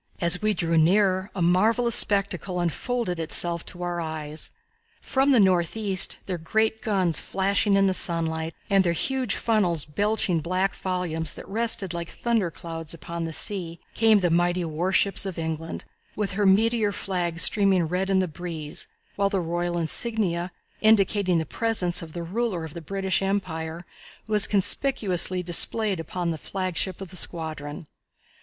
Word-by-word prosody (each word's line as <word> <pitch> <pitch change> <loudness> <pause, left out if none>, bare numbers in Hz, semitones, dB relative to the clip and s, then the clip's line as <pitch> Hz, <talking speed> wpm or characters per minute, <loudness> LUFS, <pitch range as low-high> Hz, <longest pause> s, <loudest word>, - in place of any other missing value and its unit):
As 170 +2 +2
we 215 -1 +1
drew 165 -1 +1
nearer 190 +3 +2
a 180 - -1
marvellous 225 +7 +3
spectacle 195 -3 +3
unfolded 180 - -2
itself 170 +1 +1
to 180 0 -7
our 175 -1 -3
eyes. 155 -1 -5 0.5
From 270 +1 0
the 260 -4 +5
northeast, 190 +1 +2
their 180 -3 -4
great 220 +6 0
guns 190 -7 0
flashing 200 +1 +1
in 195 0 +3
the 190 - +2
sunlight 165 -2 -1
and 195 -1 +3
their 170 -2 +1
huge 260 +4 -1
funnels 185 -9 +1
belching 200 +1 0
black 185 +4 -1
volumes 170 -4 -3
that - - -11
rested 205 -4 +1
like 170 -1 -5
thunder 230 -7 -1
clouds 165 -1 -6
upon 170 +1 -6
the 165 - -5
sea, 170 -2 -3
came 220 -1 +4
the 180 -4 0
mighty 175 +1 +1
warships 180 +5 +1
of 190 -3 -5
England, 160 0 -5 0.3
with 205 -2 -2
her 200 +1 +1
meteor 220 +2 +3
flag 175 -4 -3
streaming 195 -1 +4
red 185 +3 -2
in 195 - +2
the 185 -1 +1
breeze, 160 -2 -5 0.3
while 200 0 +2
the 195 -1 -1
royal 175 0 -2
insignia, 175 0 -2 0.3
indicating 200 -4 +3
the 160 - -1
presence 185 -2 0
of 160 -2 -10
the 170 - -5
ruler 190 -1 -2
of 160 -2 -8
the 170 - -8
British 190 +3 -2
Empire, 170 -4 -3 0.4
was 210 -1 +4
conspicuously 195 -4 +3
displayed 190 +3 +5
upon 170 +2 -3
the 160 - -5
flagship 185 0 -3
of 190 - -7
the 185 - -7
squadron. 160 -3 -4
180 Hz, 160 wpm, -25 LUFS, 170-200 Hz, 0.5 s, the